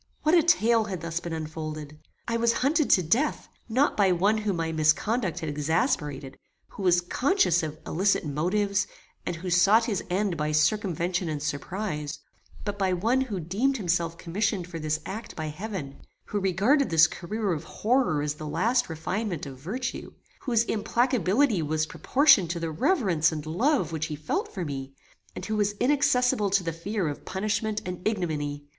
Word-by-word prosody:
What 310 - +3
a 345 - +7
tale 235 -9 +3
had 190 -6 -5
thus 165 0 -3
been 175 -1 -6
unfolded! 155 -1 -6 0.3
I 230 - -1
was 230 0 +2
hunted 305 +1 +2
to 185 - +5
death, 235 - 0 0.2
not 260 +6 +2
by 195 -3 +4
one 200 +5 +2
whom 210 -3 -1
my 165 -1 -2
misconduct 165 +6 +1
had 160 - -3
exasperated, 150 - -1 0.3
who - - -10
was 180 -2 +4
conscious 220 - +2
of 155 -1 -5
illicit 195 +1 +1
motives, 195 +8 0 0.4
and 175 - -1
who 180 +2 -5
sought 200 +6 +5
his 205 -6 -2
end 185 -1 0
by 150 0 -1
circumvention 175 +1 +1
and 150 -2 -2
surprize; 150 +2 -4 0.5
but 205 -1 -3
by 190 -1 +2
one 230 +9 +1
who 220 -8 -3
deemed 215 - 0
himself 170 -4 -1
commissioned 190 +2 -1
for 170 -1 -7
this 155 0 -1
act 215 +4 -7
by 155 -1 -4
heaven; 155 -5 -6 0.2
who 205 - -2
regarded 200 - +2
this 160 -1 +6
career 200 +3 -2
of 155 -1 -4
horror 225 - +1
as 150 0 -1
the 155 +1 -8
last 225 +11 +1
refinement 175 +2 -3
of 135 -2 -9
virtue; 240 - -5 0.3
whose 235 -4 +1
implacability 225 - +1
was 155 0 0
proportioned 205 - +4
to 170 0 -2
the 165 -1 -3
reverence 170 - +2
and 155 -1 -5
love 235 - +1
which 160 -1 -2
he 155 - -4
felt 150 +1 -3
for 185 -4 -4
me, 135 -2 -6 0.4
and - - -6
who 215 - -2
was 205 -1 +1
inaccessible 250 -3 +2
to 195 -1 +2
the 165 -1 -2
fear 190 +2 -2
of 145 - -5
punishment 215 +2 -2
and 180 -1 -5
ignominy! 150 -8 -2
180 Hz, 175 wpm, -27 LUFS, 155-220 Hz, 0.5 s, a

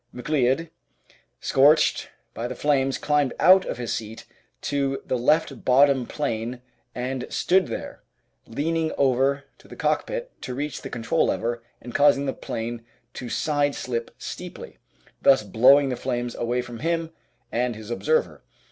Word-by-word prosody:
McLeod, 135 +4 0 0.7
scorched 145 +4 +3 0.2
by 115 - -4
the 125 - -6
flames, 135 -2 +1
climbed 145 -3 +1
out 185 +1 +6
of - - -4
his 120 -2 -3
seat 110 0 -6 0.4
to 140 -1 -1
the - - -1
left 135 +1 +1
bottom 135 -1 +4
plane 120 -3 -3 0.3
and 125 +1 -3
stood 185 0 +2
there, - - -6 0.5
leaning 160 +6 -1
over 135 +1 +2 0.2
to - - -18
the - - -11
cockpit - - -1
to 125 - -5
reach 145 +1 -4
the - - -7
control 115 -2 0
lever 120 +1 -1 0.2
and 120 0 -10
causing 145 -1 +4
the 135 - -1
'plane 115 +1 -5 0.3
to 125 - -7
side 145 0 0
slip 120 -2 -3
steeply, - - -8 0.4
thus 135 -5 +5
blowing 130 +7 +5
the 125 - -1
flames 120 0 -3
away 120 +1 -1
from 120 -1 -9
him 165 0 -1 0.4
and 120 0 0
his 110 +1 -9
observer. 475 - 0
135 Hz, 145 wpm, -24 LUFS, 120-145 Hz, 0.7 s, out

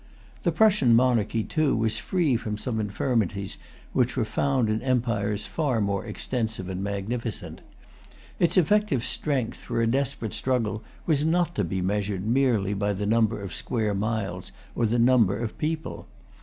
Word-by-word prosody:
The - - +1
Prussian 200 - +4
monarchy, 115 -3 +2
too, 155 +2 +1
was 110 -1 +1
free 155 - +1
from 110 -3 -3
some 110 0 -3
infirmities 100 -2 -1 0.3
which 125 +1 +1
were 120 - +2
found 130 0 +1
in 110 +1 0
empires 115 -5 0
far 140 -8 0
more 100 -2 0
extensive 110 -7 -3
and 95 +1 -3
magnificent. 100 +2 -4 0.8
Its 170 +1 +2
effective 185 - +3
strength 135 -6 -1
for - - -3
a 115 - +3
desperate 125 -2 -1
struggle 110 -1 -1 0.2
was 150 -3 +2
not 170 +2 +2
to 105 - 0
be 95 +1 -2
measured 100 0 -1
merely 115 -5 +2
by 100 0 0
the 100 +1 -3
number 110 0 +2
of 95 -4 -6
square 110 0 -1
miles 100 -3 -2 0.2
or 115 - +1
the 115 +3 +1
number 115 -5 +4
of 115 -1 -4
people. 155 +1 -3
115 Hz, 155 wpm, -26 LUFS, 105-130 Hz, 0.8 s, Prussian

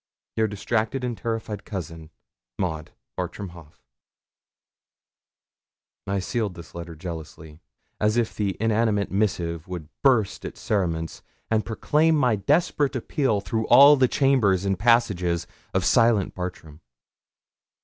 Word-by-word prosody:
'Your 110 0 +2
distracted 110 +4 -2
and 120 -2 -2
terrified 110 -3 -4
cousin, 80 -5 -7 0.5
MAUD' 80 -4 -3 0.3
'Bartram 100 -2 -5
Haugh.' 85 -3 -14 2.3
I 100 +1 0
sealed 100 0 -2
this 85 -1 -12
letter 85 -1 -7
jealously, 80 -2 -8 0.4
as 105 +2 +2
if 120 -2 0
the 100 -3 -2
inanimate 110 -2 +1
missive 90 -4 -1
would 85 -4 -7
burst 125 -8 +2
its - - -7
cerements, 85 -6 -2 0.3
and 110 -1 +2
proclaim 155 +8 +2
my 125 -6 +3
desperate 145 - +1
appeal 125 -3 0
through 110 +4 -2
all 140 +2 +8
the 130 -2 +3
chambers 115 -10 +2
and 95 -2 0
passages 95 -7 +2 0.3
of - - 0
silent 115 -4 +3
Bartram. 85 -4 -7
100 Hz, 120 wpm, -24 LUFS, 85-115 Hz, 2.3 s, all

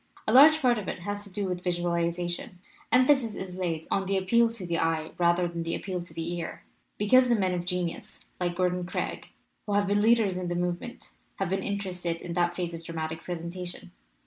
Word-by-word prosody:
A 215 - +2
large 305 +4 +9
part 240 -3 +4
of 200 - -7
it - - -4
has 205 +2 -3
to 200 - -9
do 200 +1 -2
with 180 -1 -3
visualization. 175 0 -1 0.3
Emphasis 255 -3 +4
is 185 -1 -6
laid 170 -4 -2
on 195 -1 +1
the 195 0 +1
appeal 230 +5 +3
to 225 -5 -7
the 170 -1 -1
eye 160 -1 0
rather 175 0 +3
than 170 0 -4
the 165 0 -2
appeal 185 -3 -4
to 175 - -10
the 165 +1 -3
ear, 165 - -6 0.3
because 250 +5 +5
the 240 - +5
men 190 -4 +1
of 175 -1 -2
genius, 180 -2 -3
like 175 -1 -1
Gordon 180 0 +1
Craig, 175 - -4 0.4
who 205 - -1
have 205 0 +3
been 205 +1 +2
leaders 220 -4 +4
in 180 -1 -3
the 175 - -2
movement, 175 +6 -3 0.2
have 195 -3 -2
been 195 0 0
interested 185 -4 -2
in 170 - -6
that 175 0 +1
phase 175 -1 -3
of 165 0 -7
dramatic 160 -1 -4
presentation. 175 - -6
180 Hz, 210 wpm, -28 LUFS, 175-205 Hz, 0.4 s, large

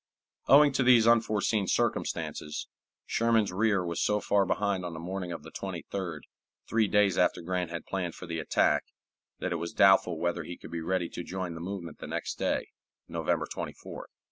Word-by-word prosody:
Owing 145 +1 +7
to 135 - 0
these 125 -3 +6
unforeseen 110 -3 +3
circumstances, 75 - -1 0.4
Sherman's 115 -3 +2
rear 100 -1 +2
was 85 -1 -2
so 105 0 +2
far 100 -2 +2
behind 100 -2 0
on 90 -1 -5
the - - -6
morning 90 +1 -4
of 85 - -6
the - - -11
23d, 90 -6 -5 0.5
three 110 -1 +2
days 100 -3 +3
after 90 -1 +2
Grant 90 0 -2
had 85 -1 -6
planned 90 -4 -3
for - - -9
the 85 -1 -4
attack, 80 - +2 0.5
that - - -3
it 90 - 0
was 85 +1 -5
doubtful 95 -3 +5
whether 85 +1 -1
he 85 +3 -7
could - - -11
be 85 -1 -3
ready 90 +1 0
to - - -6
join 90 -1 -4
the 80 - -7
movement 90 -2 -6
the - - -7
next - - -4
day, - - 0 0.4
November - - -1
24th. - - -7
95 Hz, 185 wpm, -29 LUFS, 85-105 Hz, 0.5 s, Owing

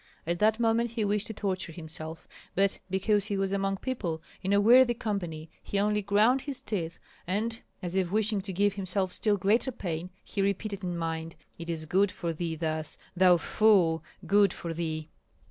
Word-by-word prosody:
At 170 +1 -1
that 220 +1 +3
moment 230 +1 +2
he 225 -2 -1
wished 205 0 0
to 220 - -5
torture 190 -4 -2
himself; 160 0 -8 0.3
but 195 +1 +2
because 200 +2 +2
he 205 -2 -2
was 195 0 0
among 195 0 0
people, 190 -10 -3 0.2
in 190 +1 -1
a 200 - +5
worthy 240 +3 +6
company, 175 -8 -4
he 200 - -3
only 210 +1 +2
ground 210 +6 +3
his 275 -2 -4
teeth, 175 -10 -3 0.3
and 225 +5 -1 0.2
as 175 -1 -3
if 185 -2 +1
wishing 215 -1 +1
to 195 0 -5
give 200 +2 +2
himself 190 -1 -2
still 210 -2 +1
greater 215 +7 +2
pain, 175 -6 -4
he 200 - -3
repeated 200 0 -1
in 175 -1 -2
mind: 165 0 -3 0.2
"It 170 0 -6
is 160 -2 -2
good 190 +4 +2
for 170 -2 -3
thee 165 0 -3
thus, 155 -1 -2 0.2
thou 180 -1 +6
fool! 175 -5 +3 0.2
good 200 -1 +4
for 170 -1 -5
thee!" 160 -2 -3
195 Hz, 185 wpm, -29 LUFS, 170-210 Hz, 0.3 s, worthy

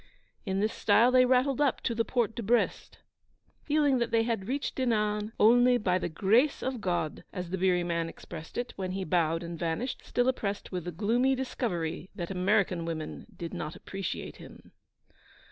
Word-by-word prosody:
In 190 +1 0
this 215 +1 0
style 225 +4 +4
they 255 0 +6
rattled 260 +2 +2
up 285 -3 +2
to 235 - -1
the 230 0 +1
Porte 230 -2 0
de - - -3
Brest, 235 +3 0 0.6
feeling 290 -3 +2
that 235 -1 0
they 230 -1 +3
had 225 -4 -2
reached 275 +3 -2
Dinan 210 -4 0
'only 245 +3 +6
by 185 -5 +1
the 175 - -2
grace 220 - +2
of 260 -3 -2
God,' 175 -5 -2
as 180 -2 -5
the 190 - -1
beery 180 -1 +2
man 170 -1 -1
expressed 165 -1 -10
it, 245 0 -3
when 185 -1 -3
he 190 0 -2
bowed 165 -2 +1
and 170 -1 -6
vanished, 175 +10 -2
still 245 0 0
oppressed 205 -6 -2
with 180 -3 -4
the 175 - -3
gloomy 235 +9 +2
discovery 185 -10 -3
that 175 +1 -4
American 185 -1 +1
women 160 -2 -5
did 170 -3 -6
not 155 +1 -5
appreciate 195 0 -5
him. - - -14
205 Hz, 180 wpm, -29 LUFS, 175-245 Hz, 0.6 s, they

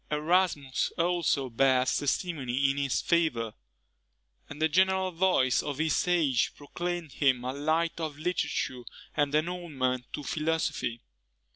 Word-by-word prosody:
Erasmus 150 -3 +1
also 170 -6 +1
bears 130 +1 +2
testimony 140 -4 0
in 140 - -5
his 140 -2 0
favour; 155 -10 +1 1.0
and 145 - -9
the 160 - +3
general 190 +3 +2
voice 165 -8 +2
of 145 -2 -4
his 160 +2 +1
age 155 -9 +2
proclaimed 175 +2 -4
him 130 -3 +2
a 130 +1 -3
light 160 +4 0
of 155 -3 -4
literature 150 -6 -2 0.3
and 145 -1 +1
an 155 +2 +2
ornament 135 -8 -2
to 145 - -5
philosophy. 155 -7 -1
150 Hz, 130 wpm, -29 LUFS, 130-170 Hz, 1.0 s, the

